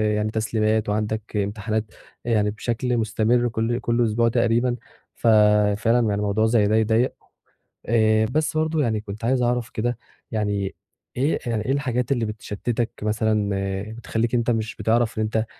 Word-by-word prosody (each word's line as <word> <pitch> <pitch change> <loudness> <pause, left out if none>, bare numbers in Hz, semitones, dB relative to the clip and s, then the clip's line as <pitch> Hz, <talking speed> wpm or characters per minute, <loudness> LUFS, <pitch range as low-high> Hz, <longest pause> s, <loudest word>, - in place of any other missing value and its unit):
يعني 105 0 -1
تسليمات 110 -1 0
وعندك 105 +1 -2
إمتحانات 105 +2 -1 0.4
يعني 105 -3 +2
بشكل 120 +3 -2
مستمر 115 +2 +1
كل 115 +1 -1
كل 120 -1 +1
أسبوع 115 +1 +2
تقريبًا، 120 +1 +2 0.4
ف - - -2 0.5
فعلًا 115 +3 +2
يعني 110 -3 +1
الموضوع 105 +1 +1
زي 110 -2 +3
ده 105 - +2
يضايق 110 +3 +2 0.7
آآ، 110 -1 +3
بس 155 +6 -1
برضه 160 0 +1
يعني 110 -4 0
كنت 105 +1 -7
عايز 130 +1 +2
أعرف 120 -1 0
كده، 120 +1 -2 0.3
يعني 105 -3 -1 0.4
إيه 140 +5 +1
يعني 115 -3 -2
إيه 130 - 0
الحاجات 125 -3 -1
اللي 120 -4 +1
بتشتتك 110 +2 -3
مثلًا 105 -1 +1 0.5
بتخليك 115 +1 -2
إن 120 - +4
أنت 120 +1 +1
مش 110 -1 -2
بتعرف 115 0 +1
إن 110 - +1
أنت 110 +1 0
110 Hz, 160 wpm, -23 LUFS, 110-120 Hz, 0.7 s, إن